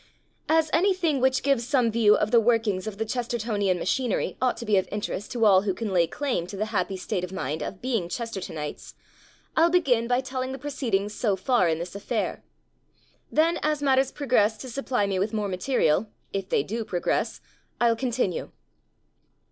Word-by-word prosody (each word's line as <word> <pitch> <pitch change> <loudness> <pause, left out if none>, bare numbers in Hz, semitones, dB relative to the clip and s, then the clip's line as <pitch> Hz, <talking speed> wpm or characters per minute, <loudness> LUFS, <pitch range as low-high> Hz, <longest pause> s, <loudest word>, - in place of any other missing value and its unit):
As 320 -1 +3
anything 340 -5 +2
which 260 0 +2
gives 265 -4 +1
some 255 -5 +2
view 215 -2 +5
of 210 - 0
the 235 - +6
workings 220 -4 +1
of 210 -2 -5
the 225 - -1
Chestertonian 220 -5 -1
machinery 245 +5 -1
ought 255 -1 +1
to 235 - -6
be 210 -2 +2
of 190 - +1
interest 205 0 -4
to 230 -2 +2
all 190 -3 +6
who 195 -2 -1
can 215 -2 -3
lay 170 -2 +4
claim 245 - -2
to 195 - -7
the 215 - 0
happy 195 -2 0
state 180 -1 -3
of 180 - -5
mind 155 -4 -3
of 190 +7 -6
being 230 -9 -1
Chestertonites, 190 -10 -5 0.6
I'll 330 +2 +5
begin 265 -10 +2
by 245 +1 +2
telling 260 0 -4
the - - -5
proceedings 230 -8 -2
so 210 -3 0
far 190 -2 +2
in 160 - +1
this 170 +1 -6
affair. 210 +3 -3 0.9
Then 330 +2 +2
as 300 -1 0
matters 270 -1 +3
progress 225 -6 +2
to 260 - -7
supply 255 -4 0
me 195 -2 -1
with 210 +4 -1
more 210 -2 -1
ma 185 -2 -3
terial 190 - +1 0.3
(if 195 -1 -3
they - - +2
do 225 +8 -3
progress) 180 -4 -1 0.4
I'll 235 -1 +4
con 255 +2 -2
tinue. 230 -7 -1
225 Hz, 190 wpm, -26 LUFS, 195-260 Hz, 0.9 s, the